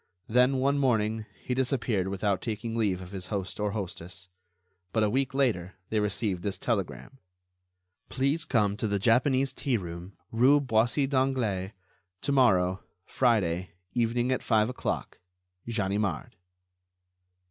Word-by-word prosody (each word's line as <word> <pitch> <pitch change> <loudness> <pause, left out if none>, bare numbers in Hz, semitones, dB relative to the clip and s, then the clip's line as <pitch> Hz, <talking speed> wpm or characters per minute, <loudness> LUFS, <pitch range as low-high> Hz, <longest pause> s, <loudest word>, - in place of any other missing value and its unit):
Then, 125 +3 +4
one 140 +2 +2
morning, 110 -4 +1 0.2
he 125 - -2
disappeared 125 -7 0
without 100 0 0
taking 115 0 -4
leave 100 -5 0
of 90 0 -10
his 95 -2 -6
host 95 0 -4
or 105 0 0
hostess. 90 -2 -6 0.6
But 110 - +2
a 105 - +2
week 135 +1 0
later, 105 -10 0 0.2
they 110 - +2
received 105 -2 -1
this 100 0 -2
telegram: 115 +4 -3 0.9
"Please 140 +5 +1
come 105 -10 +1
to 110 - -1
the 100 -1 0
Japanese 130 +5 +3
Tea 130 -3 0
room, 85 0 -7 0.2
rue 130 +6 +5
Boissy 125 +1 +2
d'Anglas, 130 -9 0 0.5
to 140 - -1
morrow, 95 -9 +3 0.2
Friday, 95 -8 +1 0.2
evening 120 +1 +1
at 130 - 0
five 110 -1 +2
o'clock. 125 - -4 0.5
Ganimard." 105 -3 -1
110 Hz, 135 wpm, -28 LUFS, 100-130 Hz, 0.9 s, rue